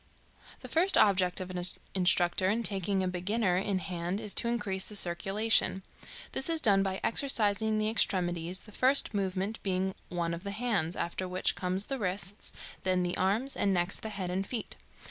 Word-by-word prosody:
The -, -, -8 dB
first 360 Hz, +4 st, +4 dB
object 185 Hz, -3 st, +3 dB
of 185 Hz, 0 st, -6 dB
an 180 Hz, -1 st, -4 dB, 0.3 s
instructor 180 Hz, 0 st, +2 dB
in 225 Hz, +3 st, 0 dB
taking 195 Hz, -2 st, 0 dB
a -, -, -1 dB
beginner 185 Hz, +2 st, -1 dB
in 195 Hz, +1 st, -1 dB
hand 180 Hz, 0 st, -4 dB
is 210 Hz, -2 st, -3 dB
to 235 Hz, -, +4 dB
increase 205 Hz, -5 st, 0 dB
the 210 Hz, -, -4 dB
circulation. 195 Hz, +2 st, +1 dB, 0.5 s
This 265 Hz, -, +2 dB
is 325 Hz, -1 st, +3 dB
done 205 Hz, -9 st, +4 dB
by 190 Hz, -1 st, -2 dB
exercising 220 Hz, -4 st, +1 dB
the 215 Hz, 0 st, 0 dB
extremities, 180 Hz, -4 st, 0 dB
the 210 Hz, -, -14 dB
first 260 Hz, +2 st, +4 dB
movement 195 Hz, +2 st, -2 dB
being 190 Hz, 0 st, -1 dB, 0.2 s
one 170 Hz, -2 st, -2 dB
of 170 Hz, +2 st, -7 dB
the 200 Hz, -, -5 dB
hands, 200 Hz, -6 st, -1 dB
after 185 Hz, +2 st, -3 dB
which 180 Hz, +1 st, 0 dB
come 180 Hz, 0 st, -3 dB
the 260 Hz, +7 st, +4 dB
wrists, 195 Hz, 0 st, -3 dB, 0.3 s
then 185 Hz, -1 st, +1 dB
the 175 Hz, 0 st, -1 dB
arms, 215 Hz, +9 st, 0 dB
and 195 Hz, -1 st, +1 dB
next 175 Hz, +2 st, 0 dB
the 220 Hz, -, -6 dB
head 190 Hz, -4 st, -4 dB
and 190 Hz, +2 st, -2 dB
feet. 235 Hz, -4 st, -4 dB
195 Hz, 185 wpm, -30 LUFS, 180-215 Hz, 0.5 s, first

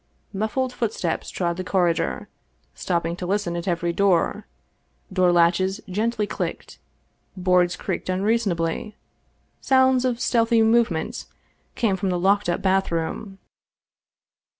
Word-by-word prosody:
Muffled 235 Hz, +6 st, -1 dB
footsteps 210 Hz, -9 st, -2 dB
trod 170 Hz, -2 st, -2 dB
the 185 Hz, -, -3 dB
corridor, 180 Hz, -3 st, 0 dB, 0.5 s
stopping 170 Hz, -2 st, -2 dB
to 180 Hz, -, -5 dB
listen 195 Hz, -3 st, -1 dB
at 170 Hz, +2 st, -5 dB
every 170 Hz, -1 st, 0 dB
door, 190 Hz, -3 st, +1 dB, 0.7 s
door 185 Hz, -2 st, +3 dB
latches 175 Hz, +3 st, +2 dB
gently 215 Hz, +3 st, -1 dB
clicked, -, -, -5 dB, 0.6 s
boards 180 Hz, -1 st, +2 dB
creaked -, -, -4 dB
unreasonably, 195 Hz, -1 st, -1 dB, 0.6 s
sounds 260 Hz, -1 st, +3 dB
of 245 Hz, -2 st, 0 dB
stealthy 230 Hz, -2 st, +3 dB
movements 225 Hz, -3 st, +1 dB, 0.5 s
came 215 Hz, -5 st, +1 dB
from 190 Hz, +1 st, -2 dB
the 180 Hz, -, 0 dB
locked 195 Hz, +1 st, +2 dB
up 175 Hz, -, -1 dB
bathroom. 190 Hz, +1 st, -1 dB
190 Hz, 115 wpm, -23 LUFS, 175-220 Hz, 0.7 s, door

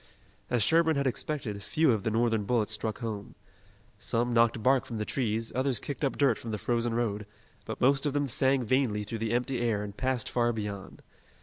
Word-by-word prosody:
As 120 Hz, -3 st, +2 dB
Sherburne 160 Hz, +4 st, +4 dB
had 140 Hz, 0 st, 0 dB
expected, 125 Hz, -5 st, -2 dB
few 155 Hz, +7 st, +2 dB
of 110 Hz, -3 st, 0 dB
the 110 Hz, -, -1 dB
Northern 115 Hz, -1 st, +1 dB
bullets 110 Hz, -2 st, +1 dB
struck 110 Hz, +2 st, -2 dB
home. 105 Hz, -3 st, -5 dB, 0.6 s
Some 120 Hz, +1 st, 0 dB
knocked 115 Hz, -1 st, +3 dB
bark 130 Hz, -1 st, +3 dB
from 115 Hz, -, -6 dB
the 105 Hz, -, -2 dB
trees, 115 Hz, -3 st, -1 dB
others 130 Hz, -2 st, 0 dB
kicked 140 Hz, 0 st, -6 dB
up 135 Hz, -, 0 dB
dirt 135 Hz, -6 st, +3 dB
from 115 Hz, -, -7 dB
the 110 Hz, -, -2 dB
frozen 120 Hz, +1 st, -1 dB
road, 105 Hz, -3 st, -1 dB, 0.4 s
but -, -, -6 dB
most 135 Hz, +3 st, +3 dB
of 140 Hz, -, -1 dB
them 145 Hz, -1 st, 0 dB
sang 130 Hz, +1 st, +2 dB
vainly 120 Hz, -3 st, +1 dB
through 110 Hz, +2 st, -5 dB
the 110 Hz, 0 st, -2 dB
empty 125 Hz, +1 st, 0 dB
air 110 Hz, -4 st, 0 dB
and 100 Hz, -1 st, -7 dB
passed 130 Hz, -1 st, -1 dB
far 120 Hz, -1 st, +1 dB
beyond. 105 Hz, -3 st, -6 dB
120 Hz, 205 wpm, -29 LUFS, 110-130 Hz, 0.6 s, Sherburne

